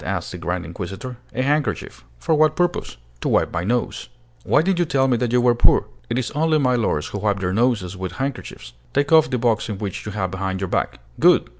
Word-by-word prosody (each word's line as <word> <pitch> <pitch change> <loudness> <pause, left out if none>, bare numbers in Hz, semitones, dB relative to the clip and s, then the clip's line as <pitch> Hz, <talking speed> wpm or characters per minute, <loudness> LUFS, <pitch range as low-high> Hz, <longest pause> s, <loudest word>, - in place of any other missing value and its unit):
asked 95 -3 -3
the 90 - -6
grand 85 +1 -3
inquisitor. 95 +8 -6 0.2
"A 130 - 0
handkerchief." 140 - -1
"For 160 - 0
what 155 0 +4
purpose?" 175 - -1 0.2
"To - - -2
wipe - - +2
my 85 - -1
nose." 120 +4 -2 0.3
"Why 150 - +3
did 185 0 +1
you 175 - +3
tell 135 -3 +2
me 125 - +3
that 120 -1 -1
you 125 - +4
were 120 0 +4
poor? 120 - +4 0.2
It 115 - -1
is 130 -1 -2
only 155 +1 +2
milords 125 - +1
who 100 - -4
wipe 100 -1 0
their 90 -1 -1
noses 105 -5 +1
with 95 -1 -5
handkerchiefs. 135 - -5 0.2
Take 140 +1 +1
off 160 -5 +6
the 130 - 0
box 115 -2 +1
which 105 -2 -5
you 105 - -4
have 95 -3 -2
behind 95 0 -3
your 95 -1 -3
back. - - -1 0.2
Good! - - +5
115 Hz, 220 wpm, -22 LUFS, 95-135 Hz, 0.3 s, off